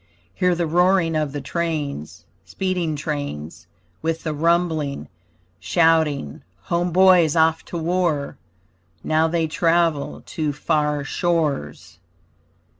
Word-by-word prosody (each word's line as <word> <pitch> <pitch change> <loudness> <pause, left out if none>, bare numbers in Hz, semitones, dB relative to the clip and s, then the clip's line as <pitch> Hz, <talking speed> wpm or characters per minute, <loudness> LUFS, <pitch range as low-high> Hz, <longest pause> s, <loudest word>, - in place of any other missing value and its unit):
Hear 180 - +1
the 170 0 -1
roaring 175 0 +2
of 155 -2 0
the 145 0 -5
trains, 150 - -4 0.2
Speeding 180 -4 -2
trains 145 - -5 0.3
With 165 0 -2
the 155 - -2
rumbling. 160 -2 0 0.5
Shouting 150 - +1 0.2
home 175 +1 -1
boys 180 -3 +5
off 160 0 +3
to 175 - -6
war! 165 -3 -1 0.7
Now 160 +1 +2
they 165 0 0
travel 165 -2 0
to 155 -4 -3
far 150 -1 0
shores. 140 - -2
160 Hz, 110 wpm, -22 LUFS, 145-170 Hz, 0.7 s, boys